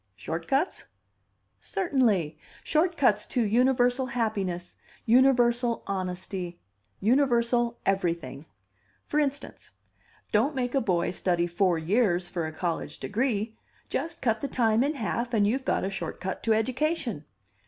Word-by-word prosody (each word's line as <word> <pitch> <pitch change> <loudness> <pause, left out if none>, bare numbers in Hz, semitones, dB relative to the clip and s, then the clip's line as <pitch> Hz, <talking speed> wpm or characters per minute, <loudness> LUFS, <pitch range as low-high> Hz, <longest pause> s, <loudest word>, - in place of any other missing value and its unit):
"Short 160 - -5
cuts?" 280 +7 0 0.7
"Certainly. 225 - 0 0.2
Short 335 +2 +1
cuts 245 -7 +3
to 245 - +1
universal 245 +3 +2
happiness, 200 -8 -2 0.3
universal 240 -1 +3
honesty, 185 -2 -4 0.4
universal 240 0 +2
everything. 170 -7 -1 0.6
For 300 - 0
instance: 285 -1 -3 0.6
Don't 250 +8 +2
make 245 -2 -1
a 275 - +2
boy 175 -5 +1
study 175 -1 0
four 175 0 +1
years 180 +1 +1
for 170 -2 -3
a - - -5
college 165 +1 -3
degree; 220 -1 -1 0.3
just 330 +1 -3
cut 225 -3 +1
the 280 - -1
time 230 -2 +2
in 295 +3 0
half, 235 0 -2
and 205 -2 +4
you've 260 +6 0
got - - +1
a 190 - -2
short 175 -4 -5
cut 190 0 -4
to 225 - +2
education. 255 - -1
225 Hz, 130 wpm, -27 LUFS, 180-255 Hz, 0.7 s, and